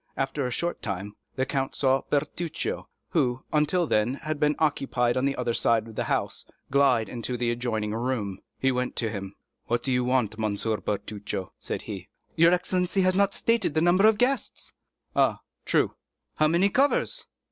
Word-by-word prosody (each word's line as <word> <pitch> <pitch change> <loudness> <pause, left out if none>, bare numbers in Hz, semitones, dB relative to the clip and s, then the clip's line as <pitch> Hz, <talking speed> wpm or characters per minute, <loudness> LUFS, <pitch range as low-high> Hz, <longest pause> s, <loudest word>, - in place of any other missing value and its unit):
After 135 0 -1
a - - -2
short 170 +8 -2
time, 100 0 -4 0.2
the 130 - 0
count 135 0 -2
saw 135 -1 +3
Bertuccio, 155 +3 -2 0.2
who, 125 0 +1
until 155 +4 +3
then, 115 -2 +1
had 155 +1 -4
been 150 0 +3
occupied 135 -5 +1
on 130 +1 +1
the 140 0 +1
other 120 - -1
side 115 -1 +2
of 110 - -10
the - - -2
house, - - -1 0.3
glide 135 -5 +4
into 125 +1 -4
an 120 - -7
adjoining 120 -3 -1
room. 115 -5 -2 0.2
He 135 - +2
went 125 0 -2
to 115 -3 -1
him. 100 -2 -6 0.3
"What 120 0 0
do 135 - 0
you 125 0 +2
want, 125 -4 +1
M. 105 -2 0
Bertuccio?" 105 -2 -3
said - - -4
he. - - -7 0.3
"Your 170 +1 +6
excellency 180 +1 +1
has 185 0 +3
not 200 +1 +2
stated 230 -9 +1
the 155 - +3
number 180 +5 +5
of 220 -1 +4
guests." 260 +4 -1 0.4
"Ah, - - +3 0.2
true." - - +2 0.4
"How 155 - +4
many 170 +5 +3
covers?" 285 - +1
130 Hz, 180 wpm, -27 LUFS, 115-160 Hz, 0.4 s, Your